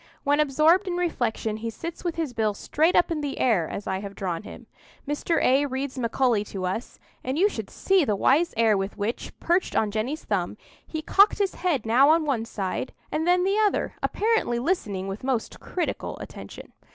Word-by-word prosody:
When 290 +1 +2
absorbed 305 +7 +4
in 350 -1 -1
reflection, 235 -10 -1
he 230 +1 -4
sits 335 +9 -7
with 345 -2 -2
his 320 -6 -2
bill 215 -3 0
straight 320 - +1
up 350 - +4
in 310 -2 -1
the 285 -2 -3
air, 200 -11 +2
as 200 - -5
I 190 0 -2
have 200 0 -7
drawn 180 -4 -3
him. - - -11 0.4
Mr. 295 +3 0
A— 275 +3 +4
reads 265 0 -4
Macaulay 235 -2 +1
to 190 -2 -5
us, 190 +6 -4 0.3
and 260 +3 -2
you 385 +5 +5
should - - -5
see 385 -2 +2
the 215 -7 +1
wise 305 - +3
air 225 -2 +4
with 195 +1 -3
which, 210 +4 -3
perched 350 +2 +1
on 215 -2 +2
Jenny's 245 +9 -2
thumb, 195 -1 -1 0.3
he 315 -1 -4
cocked 400 +6 +5
his 400 -2 0
head 315 -11 -1
now 275 +8 +5
one 275 -8 -1
side 200 +1 -4 0.2
and 315 +2 -1
then 360 0 +4
the 395 +3 +2
other, 420 -2 +1
apparently 435 - +1
listening 220 - -1
with 195 +4 -6
most 255 -4 -2
critical 355 -3 -3
attention. - - -10
265 Hz, 195 wpm, -25 LUFS, 215-335 Hz, 0.4 s, you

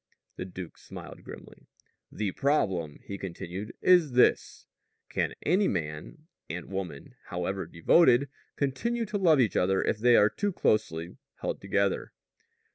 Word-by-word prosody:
The - - -5
duke 90 -2 -9
smiled - - -10
grimly. - - -12 0.4
"The 105 -3 -2
problem," 95 - 0
he 100 -1 -6
continued, 95 +3 -6
"is 175 -7 +5
this: 125 - +2 0.4
Can - - -1
any 190 +5 +3
man 80 - -4 0.2
and 85 +3 -5
woman, 90 -7 -5
however 90 +1 -3
devoted, 125 - +4 0.3
continue 230 - -1
to 210 -1 -3
love 165 -6 +5
each 110 -8 +2
other 95 +1 +2
if - - 0
they 120 +1 +5
are 105 -1 +5
too 205 -1 -1
closely 85 - 0 0.2
held - - -4
together?" 100 0 0
100 Hz, 135 wpm, -28 LUFS, 90-145 Hz, 0.4 s, is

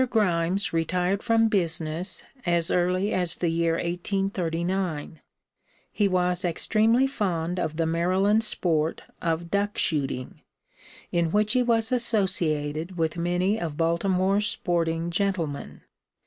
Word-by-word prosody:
Grimes 185 -4 +1
retired 180 +4 0
from 225 -1 +3
business 170 -2 -1 0.2
as 170 -1 +1
early 180 +3 +1
as 180 -2 0
the 175 - -1
year 165 0 +1
1839. 175 -2 -2 0.7
He 205 - +1
was 180 0 +1
extremely 220 +8 +2
fond 180 -9 -2
of 155 -2 -2
the 165 - +1
Maryland 185 +6 +2
sport 165 -7 +1 0.2
of 170 0 -2
duck 205 +1 0
shooting, 135 -4 -1 0.7
in 170 -1 +1
which 210 +3 +2
he 255 - +3
was 230 -2 +1
associated 180 -8 0
with 160 -1 0
many 180 +5 0
of 160 -4 -4
Baltimore's 185 +4 +1
sporting 170 -3 -1
gentlemen. 170 -6 -2
180 Hz, 120 wpm, -26 LUFS, 165-200 Hz, 0.7 s, from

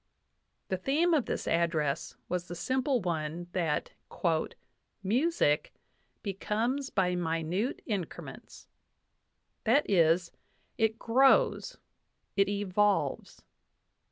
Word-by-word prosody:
The 190 - 0
theme 300 - +2
of 290 -6 +2
this - - -3
address 165 -3 0
was 180 0 -2
the 175 - -6
simple 260 - 0
one 165 -1 -3
that 165 -5 -1 1.1
"Music. 215 - +1 0.2
*.. - - -43
becomes 225 +7 -1
by 180 -2 +1
minute 175 - -1
increments" 200 -7 -6 1.0
that 260 +6 +3
is, 170 -2 +3 0.4
it 220 0 +1
grows, 260 +4 +3 0.6
it 195 0 +3
evolves. 205 0 0
195 Hz, 95 wpm, -30 LUFS, 170-235 Hz, 1.1 s, that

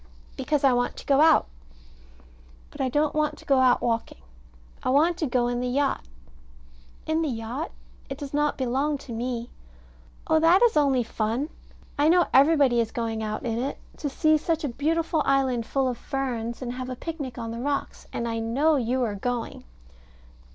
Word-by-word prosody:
Because 295 -2 -1
I 270 -2 +5
want 245 0 0
to - - -9
go 275 0 +4
out. 320 -1 +6 1.3
But - - -7
I 260 - +1
don't 295 +3 +1
want 305 0 0
to - - -15
go 275 -2 +3
out 255 -1 +4
walking. 230 - -2 0.6
I - - -2
want 310 +6 +3
to 310 - 0
go 245 -1 +1
in 245 0 -1
the 250 - -2
yacht. 275 +3 0 1.0
In 315 +1 0
the 315 - 0
yacht? 240 +6 -4 0.4
It 270 - -5
does 280 -1 -7
not 295 0 +1
belong 270 +3 0
to 270 -2 -11
me. 235 0 -4 0.7
Oh, 315 - +3
that 340 +6 +5
is 475 - +4
only 275 -4 +3
fun. 230 +6 -2 0.5
I 295 +2 +4
know 350 +1 +5
everybody 275 -3 +5
is 225 - -2
going 225 -2 -3
out 215 +1 -4
in 230 -1 -1
it 270 +3 -3 0.2
to 290 - -3
see 310 +2 +3
such 325 0 -1
a 290 - -1
beautiful 320 +5 0
island 260 -4 +1
full 270 -1 0
of 245 -2 -3
ferns, 245 -3 -3
and 245 -1 -4
have 255 0 -5
a 255 - -4
picnic 285 -4 -6
on 230 -1 -5
the 230 - -5
rocks; 280 +2 -3
and 235 - -3
I 225 0 -2
know 275 +8 +2
you 250 +1 0
are 220 -3 -1
going. 235 +3 -4
265 Hz, 190 wpm, -25 LUFS, 240-295 Hz, 1.3 s, out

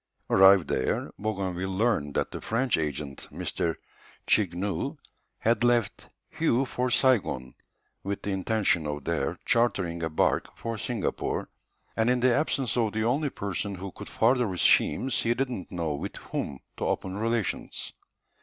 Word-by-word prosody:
Arrived 95 -4 +7
there, 65 - -1
Bougainville 95 -3 -2
learned 100 -11 +1
that - - 0
the - - -6
French 120 +2 +1
agent, 75 -3 -3
M. - - -6 0.8
Chaigneu, 95 0 +1 0.4
had 115 0 +1
left 120 -4 +1 0.3
Hué 135 -5 +3
for 125 +1 -1
Saigon, 105 - +2 0.5
with 100 0 -4
the 100 - -2
intention 95 -4 +1
of 75 -1 -4
there 80 -4 -1
chartering 95 -8 +1
a 80 - -1
barque 80 - 0
for 115 -2 -4
Singapore, 115 -1 -2 0.5
and 115 +1 +2
in 125 0 +3
the 125 0 +4
absence 135 -2 0
of 110 -3 +1
the 110 0 0
only 140 +6 +1
person 100 -2 -3
who 95 +1 -6
could - - -10
further 125 -3 +2
his 90 - -1
schemes 130 - +3
he 120 +1 +1
did 135 0 -1
not 95 -7 -6
know 85 -4 -1
with 70 - -5
whom 70 - -4 0.2
to - - -2
open 95 +1 -2
relations. 115 -1 -1
100 Hz, 155 wpm, -28 LUFS, 85-120 Hz, 0.8 s, Arrived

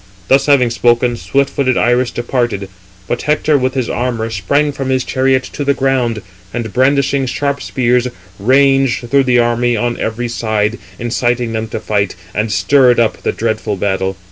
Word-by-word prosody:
Thus 135 +2 +4
having 130 -5 +4
spoken, 120 +1 +2
swift 140 +3 0
footed 130 -3 0
Iris 120 +1 +2
departed. 120 -5 -2 0.4
But 120 - -2
Hector 150 0 +1
with 130 -1 0
his 130 -3 -1
armour 120 -2 -2
sprang 140 +9 0
from 135 -1 -4
his 130 -1 +1
chariot 130 0 +1
to 145 - -3
the 140 0 +1
ground, 125 -6 0 0.3
and 115 -2 -4
brandishing 135 +1 +2
sharp 140 +2 -2
spears, 125 -1 +1 0.3
ranged 135 +1 +2
through 140 -1 +4
the 125 -1 +3
army 120 0 +1
on 120 +2 -2
every 115 +2 -2
side, 110 -1 -1 0.2
inciting 120 0 -1
them 110 0 -2
to - - -5
fight, 100 -3 -1 0.2
and 110 +1 -1
stirred 125 +3 +4
up 115 -2 +1
the - - 0
dreadful 110 -2 -2
battle. 95 -1 -1
120 Hz, 170 wpm, -15 LUFS, 115-135 Hz, 0.4 s, Thus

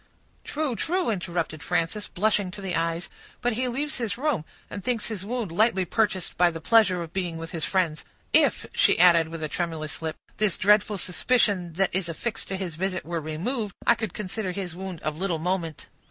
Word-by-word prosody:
"True, 295 -5 -1
true," 350 +1 0
interrupted 170 -5 -2
Frances, 180 +5 -1
blushing 205 0 +1
to 195 +3 -9
the 190 -3 -2
eyes; 165 +2 -1 0.3
"but 245 0 +1
he 255 +3 0
leaves 285 +4 -2
his 225 -4 -2
room, 270 - 0 0.2
and 200 - -7
thinks 235 -4 0
his 210 -4 -4
wound 225 -3 -3
lightly 190 0 +3
purchased 190 -3 0
by 175 -1 +6
the 165 -1 -6
pleasure 190 -1 +4
of 165 - -10
being 175 -4 -2
with 165 0 -6
his 160 -3 -2
friends. 170 -5 0 0.3
If," - - +4
she - - +4
added, 170 -2 +6
with 165 0 -6
a - - 0
tremulous 160 -2 -3
lip, 160 -1 -2 0.2
"this 210 -4 +3
dreadful 210 +1 +4
suspicion 185 -2 +1
that 195 +2 +1
is 185 -2 -1
affixed 225 +7 -3
to 195 - -2
his 185 -3 -4
visit 185 0 -2
were 165 0 -2
removed, 195 - -3
I - - +7
could 220 -2 -4
consider 195 -1 -3
his 180 -3 -4
wound 185 -2 -6
of 155 0 -2
little 180 -2 0
moment." 165 -2 -2
185 Hz, 200 wpm, -26 LUFS, 165-215 Hz, 0.3 s, I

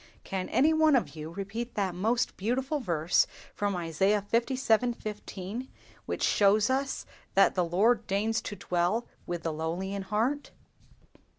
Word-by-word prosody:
Can 190 -1 -3
any 310 +4 +4
one 315 -2 +5
of 245 - 0
you 155 0 -6
repeat 200 +7 -5
that 195 -3 0
most 225 +7 0
beautiful 260 +8 -1
verse 170 - +2 0.3
from 205 -1 -1
Isaiah 190 +5 +1
(lvii. 240 -1 +2
15), 210 +2 -6 0.4
which - - -2
shows 205 +3 +4
us 270 +1 -1 0.3
that 195 - +5
the 180 - +1
Lord 205 +8 +2
deigns 215 +3 0
to 205 - -6
dwell 180 +6 0 0.2
with 175 -1 -3
the 165 - -1
lowly 170 +5 -3
in 200 - -3
heart?" 225 +9 -1
205 Hz, 150 wpm, -29 LUFS, 185-240 Hz, 0.4 s, one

